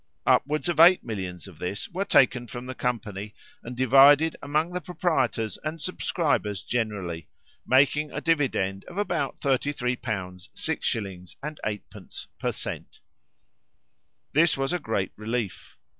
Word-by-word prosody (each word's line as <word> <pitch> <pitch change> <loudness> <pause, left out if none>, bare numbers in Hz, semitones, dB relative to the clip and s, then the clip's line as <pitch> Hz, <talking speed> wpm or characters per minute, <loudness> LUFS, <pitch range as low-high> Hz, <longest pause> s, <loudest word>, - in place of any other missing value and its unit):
Upwards 150 +4 +2
of 170 -3 -1
eight 175 +3 +8
millions 95 -6 -5
of 85 -5 -14
this 95 +3 -3
were 190 +3 -3
taken 125 -6 +4
from 120 +3 -7
the 130 - -5
company, 105 -5 -3 0.3
and 120 +1 -8
divided 140 +5 +6
among 155 +4 0
the 180 - -2
proprietors 170 - -1
and 155 +2 -4
subscribers 145 - -1
generally, 100 -9 -3 0.4
making 145 +3 +3
a - - -3
dividend 125 - 0
of 180 - -11
about 175 -9 -1
33l. 130 -2 0 0.6
6s. 95 -5 -3
8d. 125 -9 -6
per - - 0
cent. - - -7 1.3
This 155 0 +4
was 135 +4 0
a 180 - 0
great 110 - -2
relief. 110 -1 -4
130 Hz, 130 wpm, -26 LUFS, 105-155 Hz, 1.3 s, eight